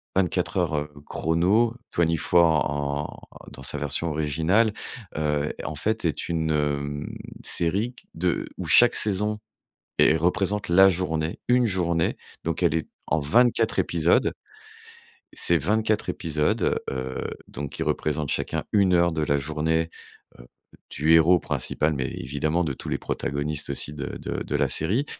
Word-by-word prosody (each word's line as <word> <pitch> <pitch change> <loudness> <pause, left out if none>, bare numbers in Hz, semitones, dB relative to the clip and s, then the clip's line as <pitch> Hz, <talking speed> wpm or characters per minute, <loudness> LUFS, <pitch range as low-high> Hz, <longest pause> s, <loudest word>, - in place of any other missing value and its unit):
24 90 -1 0
Heures 75 -4 0 0.2
chrono, 95 +9 +1 0.2
Twenty 85 -1 +1
Four 80 -3 +3
en 70 +1 -3 0.3
dans 65 - -11
sa 75 - -3
version 75 +4 -1
originale, 80 +9 +1 0.4
heu, 75 -1 0
en - - -4
fait, - - -1
est - - -1
une, 80 -2 -1
hem, 75 -1 -2 0.3
série 100 +9 +1
q 125 - -17
de 85 +1 -1
où - - -5
chaque 120 0 +6
saison 105 +1 +1 0.6
et 80 - +5
représente 95 +5 0
la 95 +3 +7
journée, 85 -3 -2
1 125 0 +4
journée. 85 -4 0 0.3
Donc 85 +2 -2
elle 80 -2 +3
est 80 - -2 0.2
en 80 - +1
24 120 +12 +3
épisodes. - - +2 1.0
C'est 85 - +3
24 105 +5 0
épisodes, 75 -4 0
heu, 65 -1 -4 0.3
donc 70 -1 -6
qui - - -4
représentent 75 -2 -1
chacun - - -2
1 95 -3 +4
heure 85 0 +3
de 80 -1 -1
la 70 -1 +1
journée, 80 +3 -1 0.5
heu, - - -13 0.4
du 80 +2 +2
héros 80 +2 +6
principal, 75 +1 -1
mais 65 -2 -2
évidemment 75 +6 -1
de 70 - -1
tous - - -8
les - - -1
protagonistes 70 +1 -3
aussi 70 +1 -2
de 70 - -5
de - - -4
de - - -2
la - - +1
série, 110 - 0
80 Hz, 150 wpm, -25 LUFS, 75-90 Hz, 1.0 s, la